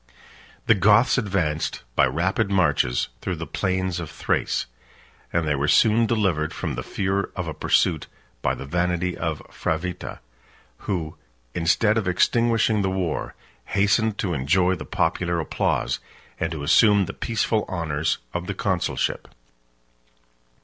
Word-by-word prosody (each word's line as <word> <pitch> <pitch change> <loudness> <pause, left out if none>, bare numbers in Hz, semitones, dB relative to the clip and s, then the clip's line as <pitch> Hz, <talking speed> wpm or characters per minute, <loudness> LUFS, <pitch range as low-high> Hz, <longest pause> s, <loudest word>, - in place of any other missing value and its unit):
The - - +6
Goths 105 +7 +4
advanced, 90 - -1
by - - +5
rapid 95 +5 0
marches, 90 -10 +2
through - - -2
the - - -5
plains 95 -2 -1
of 80 - -5
Thrace; - - -1 0.7
and 85 -2 0
they 75 - +2
were 70 +1 0
soon 115 +7 +4
delivered 95 -9 0
from - - -3
the - - -3
fear 100 0 -1
of 90 -2 -3
a 80 - -3
pursuit, 80 -1 +1 0.3
by - - 0
the 70 - -7
vanity 90 +3 0
of 80 -2 -3
Fravitta, 85 +3 -3 0.6
3811 - - -17
who, 85 -6 -2 0.4
instead 105 +6 +2
of 100 - -4
extinguishing 115 +3 +2
the 95 - 0
war, 95 -4 -2 0.3
hastened 100 +2 +2
to 95 -4 -1
enjoy 90 +7 +2
the 90 - -5
popular 85 -2 0
applause, 80 - -1 0.4
and - - -1
to 75 -3 -5
assume 100 +5 +5
the - - -6
peaceful 110 -1 0
honors 80 -3 -1 0.2
of 90 0 -3
the 100 - -3
consulship. 95 -3 -1
90 Hz, 140 wpm, -24 LUFS, 80-100 Hz, 0.7 s, The